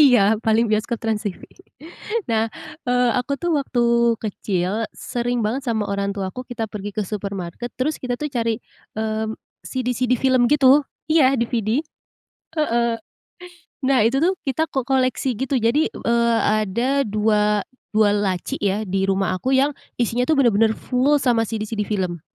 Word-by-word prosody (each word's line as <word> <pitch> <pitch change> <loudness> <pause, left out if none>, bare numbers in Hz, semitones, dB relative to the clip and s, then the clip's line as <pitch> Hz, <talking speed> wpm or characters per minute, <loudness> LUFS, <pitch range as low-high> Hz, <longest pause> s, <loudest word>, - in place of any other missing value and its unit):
iya, 240 -7 +6
paling 225 +1 +3
bioskop 220 +2 0
TransTV. 210 -4 -2 0.9
Eee, 245 +2 -1
aku 255 +3 -1
tuh 345 +3 -1
waktu 235 -4 +2
kecil 205 0 -2
sering 240 -1 -2
banget 250 +6 -2
sama 220 -3 0
orang 200 0 -1
tuaku 195 +6 -4
kita 230 -2 -3
pergi 205 -1 -6
ke 210 - 0
supermarket, 200 +2 -5
terus 300 +4 -1
kita 250 -1 -2
tuh 300 -1 -4
cari, 230 -3 0 0.4
eee, 220 0 -1 0.4
CD-CD 250 -1 0
film 255 -2 +3
gitu, 285 0 +6 0.2
iya, 290 -4 +4
DVD, 235 +4 0 0.7
heeh. 235 -5 +1 0.9
Nah, 260 -4 +3
itu 265 +5 +2
tuh, 370 +3 +2
kita 315 +4 0
ko 265 -4 -2
koleksi 260 -1 +1
gitu, 265 +4 -1
jadi, 240 +7 +2
eee, 235 0 +1 0.3
ada 250 +8 0
dua 210 -2 +1 0.3
dua 215 -1 +4
laci 195 -3 -1
ya, 205 +1 0
di 190 0 -1
rumah 195 -1 +1
aku 250 +9 -2
yang 280 +2 +2 0.2
isinya 240 0 0
itu 315 - +3
benar-benar 225 -4 +4
full 270 +4 +2
sama 245 -4 +2
CD-CD 215 -1 -3
film. 185 -5 -2
235 Hz, 145 wpm, -22 LUFS, 210-260 Hz, 0.9 s, iya